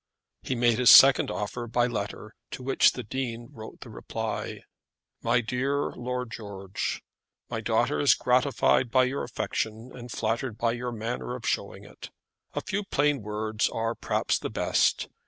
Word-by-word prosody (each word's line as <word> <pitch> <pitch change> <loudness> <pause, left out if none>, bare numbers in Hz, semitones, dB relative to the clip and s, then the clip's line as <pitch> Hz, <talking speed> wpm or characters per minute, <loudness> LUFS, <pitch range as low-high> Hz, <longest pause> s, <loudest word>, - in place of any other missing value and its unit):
He 130 - -3
made 120 -1 +2
his 125 - +6
second 135 0 +8
offer 120 +3 -4
by 120 +1 +2
letter, 110 -2 -5 0.2
to 130 - -7
which 135 +1 +4
the 125 - -6
Dean 120 0 -4
wrote 110 -6 -11
the - - -10
reply: - - -5 0.6
"My 120 +1 +2
dear 130 +5 -1
Lord 125 -1 -4
George, 100 -4 -5 0.5
"My - - -2
daughter 75 - +1
is - - +5
gratified 125 - +2
by 130 +2 +4
your 130 +2 -1
affection, 110 +3 -4
and 125 -1 -9
flattered 115 +1 -2
by 115 +1 +1
your 120 +1 -4
manner 120 +2 -4
of 125 - -7
showing - - -2
it. - - -11 0.5
A - - -1
few 200 +2 -3
plain 145 - +1
words 105 +1 -1
are 115 0 -2
perhaps - - -1
the - - -4
best. - - +1
120 Hz, 160 wpm, -27 LUFS, 110-125 Hz, 0.6 s, second